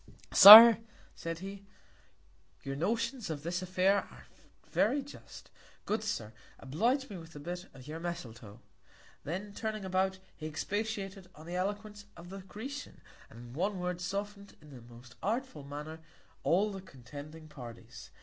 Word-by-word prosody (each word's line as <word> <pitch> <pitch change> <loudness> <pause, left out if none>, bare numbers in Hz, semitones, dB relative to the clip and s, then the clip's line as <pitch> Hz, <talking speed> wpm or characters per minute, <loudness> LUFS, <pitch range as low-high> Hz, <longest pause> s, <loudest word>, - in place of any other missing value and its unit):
Sir, 225 +2 +12 0.3
said 165 0 -6
he, 195 0 -9 1.0
Your 135 0 -5
Notions 230 - -2
in 155 -2 -4
this 175 +3 -3
Affair 185 +2 +2
are - - -8 0.4
very 285 -1 +1
just: 285 - -14 0.3
Good 215 +1 -2
Sir, 110 - -4 0.2
oblige 235 - -1
me 195 -4 -8
with 165 0 -14
a - - -8
Bit 175 +5 -7
of 130 -1 -13
your 155 +2 -7
Misletoe. 120 -10 -8 0.6
Then 190 +6 -5
turning 215 -2 -5
about, 190 0 0 0.2
he 155 - -7
expatiated 195 +2 -4
on 155 - -13
the 175 +2 -6
Eloquence 205 +2 -4
of 170 +1 -12
the 195 +1 -8
Grecian, 240 +10 -9 0.3
and 120 +2 -12
in 165 - -4
a 195 - +2
Word, 180 -3 -5
soften'd 200 +2 -6
in 150 - -17
the 130 -3 -12
most 120 +1 -16
artful 225 - -3
Manner 150 +3 -8 0.4
all 200 +5 +1
the 195 -1 -8
contending 145 +1 -12
Parties. 120 -6 -11
185 Hz, 150 wpm, -31 LUFS, 150-205 Hz, 1.0 s, Sir